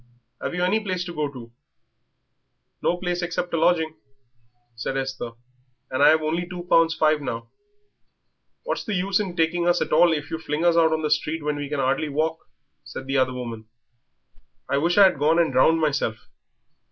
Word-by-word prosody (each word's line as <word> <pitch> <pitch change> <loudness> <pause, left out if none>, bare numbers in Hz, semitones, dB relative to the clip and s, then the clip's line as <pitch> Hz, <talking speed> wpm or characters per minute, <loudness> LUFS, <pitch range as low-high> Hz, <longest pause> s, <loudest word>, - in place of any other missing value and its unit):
Have - - -3
you 180 - -1
any 195 +5 +2
place 185 -4 -3
to 175 - -7
go 150 -2 -1
to?" 120 -4 -11 1.3
"No 175 - +1
place 180 0 -2
except 175 0 -3
a - - +2
lodging," 160 -1 +2 0.8
said 115 +4 -3
Esther; 130 -3 -4 0.6
"and 130 - -1
I - - +8
have 155 0 +3
only 170 +3 -2
two 180 -1 -6
pounds 165 -2 +3
five 155 -2 +2
now." 115 -4 -5 1.1
"What's - - -3
the 215 - -3
use 190 +2 +1
in 190 -4 -3
taking 170 +1 +1
us 175 0 +3
at - - -2
all 170 +2 +6
if 150 -1 -3
you 160 - -3
fling 155 +1 -2
us 170 -1 +4
out 165 -1 +4
on 160 0 -1
the 150 - -1
street 155 +1 0
when 150 0 -1
we 145 -1 -5
can 145 -1 -2
hardly 135 +3 0
walk?" 160 +3 -2 0.4
said 125 +1 -8
the 135 +1 -1
other 130 -1 +1
woman. 115 -3 -6 1.0
"I 140 - +1
wish 170 +5 +1
I 200 - +9
had 185 -7 +4
gone 155 +3 +3
and 165 -5 +2
drowned 160 +6 +4
myself. 140 -8 0
160 Hz, 195 wpm, -24 LUFS, 140-175 Hz, 1.3 s, I